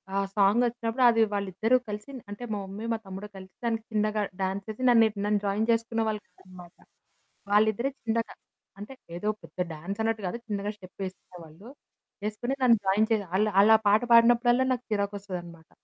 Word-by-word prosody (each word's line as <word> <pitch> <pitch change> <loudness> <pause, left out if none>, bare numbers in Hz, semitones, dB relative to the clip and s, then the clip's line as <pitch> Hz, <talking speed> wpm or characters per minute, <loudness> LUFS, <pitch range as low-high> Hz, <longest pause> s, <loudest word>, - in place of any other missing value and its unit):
ఆ - - +1 0.2
సాంగొచ్చినప్పుడు 230 +4 +2
అది 230 -1 +3
వాళ్ళిద్దరూ 200 +5 +1
కలిసి 210 +6 -6 0.2
అంటే, 205 +4 -7
మా 205 - -2
మమ్మీ, 200 +4 -7
మా 225 - -2
తమ్ముడు 190 +2 -7
కలిసి 190 0 -13
దానికి 225 -1 -1
చిన్నగా 215 0 0 0.2
డాన్స్ 195 +2 -2
యేసి 235 +4 -7
నన్నె 225 -2 +6 0.2
నన్ను 210 -1 +1
జాయిన్ 205 +3 0
జేసుకునే 230 0 0
వాళ్ళు 210 -1 -3
కాదనమాట. 180 -2 -15 0.8
వాళ్ళిద్దరే 220 +5 +3
చిన్నగా. 230 0 -1 0.5
అంటే, 210 +6 -8 0.2
ఏదో 210 +4 -4 0.2
పెద్ద - - -15 0.2
డాన్స్ 195 +7 -6
అన్నట్టు 225 -2 -1
గాదు, 235 +7 -4
చిన్నగా 205 -1 -2
స్టెప్పేసుకునే 185 -1 -9
వాళ్ళు. 160 +8 -15 0.6
వేసుకొని 215 +5 -2
నన్ను 235 -3 +6
జాయిన్ 215 +4 +3
చేయగా 205 -4 +1
ఆళ్ళు, 210 +2 +3
ఆళ్ళా 220 +2 +7
పాట 210 +1 +4
పాడినప్పుడల్లా 240 +2 +5
నాకు 245 - -4
చిరాకొస్తదనమాట. 195 -5 -4
210 Hz, 160 wpm, -27 LUFS, 195-230 Hz, 0.8 s, ఆళ్ళా